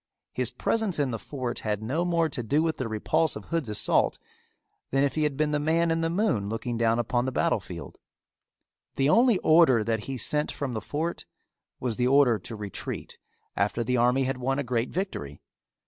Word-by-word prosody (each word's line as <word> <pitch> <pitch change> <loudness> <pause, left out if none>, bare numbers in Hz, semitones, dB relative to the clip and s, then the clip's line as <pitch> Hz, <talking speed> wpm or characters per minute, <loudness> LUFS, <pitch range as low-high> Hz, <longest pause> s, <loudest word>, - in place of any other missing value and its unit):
His - - 0
presence 220 -5 0
in 140 -3 0
the 115 - -3
fort 130 -2 -4
had 105 -1 -2
no 145 +10 0
more 170 -2 +2
to 150 -5 -5
do 145 +7 +1
with 160 -1 -1
the 130 - -2
repulse 155 +9 0
of - - -8
Hood's 165 -8 -2
assault 105 - +2 0.7
than 135 +1 +2
if 140 - +1
he 155 - -1
had 150 -3 0
been 150 0 +1
the 150 - +1
man 165 +3 +2
in 165 0 +1
the 165 - +1
moon 170 - 0
looking 115 +2 -3
down 115 0 +2
upon 120 +1 0
the 130 - -1
battle - - +1
field. - - -9 1.0
The 135 +1 +2
only 235 +4 +5
order 155 -8 +5
that 110 -1 -1
he 135 -1 -4
sent 150 +5 0
from 140 -4 -4
the 110 - -3
fort 155 +9 -3 0.5
was 120 -4 -1
the 125 0 +2
order 130 -4 +4
to 110 +5 -8
retreat 105 -3 -6 0.4
after 105 +4 0
the 125 +2 0
army 125 +3 +3
had 130 0 -1
won 135 +2 0
a 140 - 0
great 120 -1 -1
victory. 155 - -4
135 Hz, 205 wpm, -27 LUFS, 115-155 Hz, 1.0 s, only